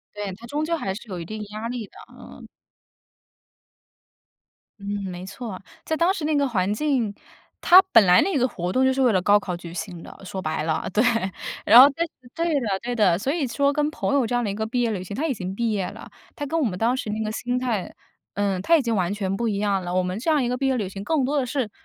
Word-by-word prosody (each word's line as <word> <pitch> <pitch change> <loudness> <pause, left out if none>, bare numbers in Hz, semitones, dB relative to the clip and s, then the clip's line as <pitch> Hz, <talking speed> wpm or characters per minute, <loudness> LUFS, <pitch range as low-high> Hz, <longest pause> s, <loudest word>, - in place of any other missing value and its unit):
对， 205 -2 -4
它 235 +3 -12
终 295 +5 -2
究 335 +1 0
还 195 -11 -3
是 225 +2 -10
有 180 -3 -5
一 - - -5
定 215 +4 -6
压 215 +2 -5
力 240 -3 -4
的， - - -33 0.2
嗯。 - - -13 2.4
嗯， 200 0 -3
没 180 +1 -7
错， 200 -1 -7 0.2
在 320 - -1
当 340 +4 +3
时 330 -6 -4
那 310 0 +1
个 285 -2 +2
环 195 -3 0
境， 240 -4 0 0.5
它 365 +2 +8
本 225 -5 +7
来 180 0 +6
那 385 -3 0
个 255 +1 +2
活 180 -3 -4
动 260 - +2
就 265 0 +3
是 270 - +1
为 245 -3 +4
了 185 - +2
高 205 +3 +5
考 185 -3 -4
举 170 -1 -9
行 170 -1 -6
的， - - -12
说 190 0 -5
白 155 -3 -2
了， 160 0 -1
对。 210 +5 +2 0.6
然 230 - +9
后 270 +3 +11
对 330 +5 -2 0.5
的 200 -5 -1
对 245 0 -3
的， 185 -6 +3
所 260 +8 -2
以 310 -3 0
说 280 +3 +1
跟 300 0 +1
朋 295 - -2
友 270 -4 +3
这 245 - -3
样 245 - +1
的 210 - -1
一 - - -3
个 220 +1 -2
毕 245 +2 -1
业 235 - +1
旅 190 -4 -3
行， 195 - -7
它 310 +9 -1
已 275 - -1
经 185 -1 -5
毕 230 +2 -1
业 195 -3 -1
了， - - -10 0.2
它 290 - -5
跟 325 +4 -1
我 310 - +1
们 185 -7 -2
当 235 +4 +2
时 260 -5 -4
那 215 +1 -2
个 215 - -2
心 245 +3 -2
态， 235 -7 -2 0.4
呃， 200 -2 -1
它 335 +7 +5
已 - - +1
经 230 -3 -1
完 185 0 0
全 195 -2 -2
不 235 - -2
一 200 -2 -1
样 200 -3 0
了， 175 +1 -3
我 185 - +2
们 185 +2 -3
这 260 +8 -1
样 300 -3 +3
一 240 - 0
个 250 - -1
毕 270 +1 -1
业 265 -1 +1
旅 200 -4 -2
行， 195 +1 -8
更 280 0 +1
多 290 - -1
的 275 - +1
是， 250 -4 -2
220 Hz, 285 characters per minute, -24 LUFS, 195-265 Hz, 2.4 s, 后